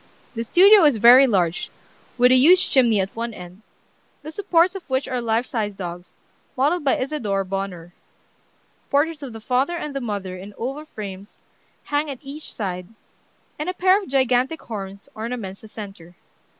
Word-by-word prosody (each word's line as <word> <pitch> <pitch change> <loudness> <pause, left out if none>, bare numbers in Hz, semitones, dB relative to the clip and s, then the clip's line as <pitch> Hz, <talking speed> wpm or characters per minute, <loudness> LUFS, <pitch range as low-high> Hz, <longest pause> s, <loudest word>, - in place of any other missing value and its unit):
"The 230 -1 -3
studio 390 - +6
is 290 -6 +4
very 245 +5 +8
large, 180 -6 0 0.5
with 250 0 +5
a - - +7
huge 340 +9 +5
chimney 235 -6 +4
at 190 0 -3
one 230 -1 -4
end, 180 +3 -11 0.6
the 310 - -7
supports 355 0 +2
of 390 -6 -9
which 260 +1 -1
are 250 -2 -2
life 230 +1 0
size 210 -5 -3
dogs, 175 -1 -8 0.4
modeled 300 +6 +1
by 275 - +2
Isadore 235 -8 -2
Bonheur. 185 -3 -5 1.0
Portraits 300 +2 +1
of 275 -3 -7
the 225 - -9
father 260 +9 0
and 300 -4 -5
mother 200 -5 -4
in 195 +3 -10
oval 275 +6 -5
frames 200 -6 -9 0.4
hang 295 +1 -1
at 275 - -5
each 285 +3 -8
side, 180 -4 -5 0.7
and 305 +4 -2
a 365 - -4
pair 375 +3 +3
of 385 - -10
gigantic 260 +3 +1
horns 200 -3 -7
ornaments 220 -4 -6
the 220 - -12
centre. 195 -5 -10
240 Hz, 165 wpm, -22 LUFS, 195-290 Hz, 1.0 s, very